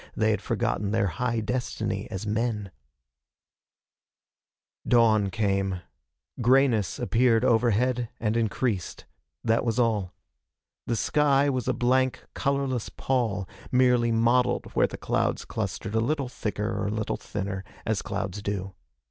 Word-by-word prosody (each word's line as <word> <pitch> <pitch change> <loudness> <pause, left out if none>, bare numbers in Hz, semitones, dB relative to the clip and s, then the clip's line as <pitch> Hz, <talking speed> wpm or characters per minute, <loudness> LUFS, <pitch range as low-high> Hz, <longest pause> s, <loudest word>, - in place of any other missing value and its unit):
They - - +2
had - - -1
forgotten 100 -1 -1
their 110 0 +2
high 115 +6 -1
destiny 110 -3 -2
as 95 0 -5
men. 105 -2 -1 2.2
Dawn 110 -4 +4
came. 95 -2 0 0.6
Grayness 120 -5 +3
appeared 120 0 +3
overhead 120 +1 +2
and 110 -1 0
increased. 110 -3 -1 0.4
That 115 0 +2
was 115 -1 -1
all. 110 -7 +1 0.7
The 115 - +1
sky 140 +4 +3
was 130 -4 -2
a - - +2
blank, 130 +1 +1
colorless 135 -4 -1
pall, 110 -7 -1 0.2
merely 125 -2 +4
mottled 120 +2 +2
where - - +3
the - - -8
clouds - - -1
clustered - - -4
a 110 - +2
little 135 +2 0
thicker 105 -2 -3
or - - -1
a - - -1
little 110 0 -2
thinner, 100 -1 -4 0.2
as - - 0
clouds 105 - -4
do. 100 -2 -3
115 Hz, 130 wpm, -27 LUFS, 105-125 Hz, 2.2 s, Dawn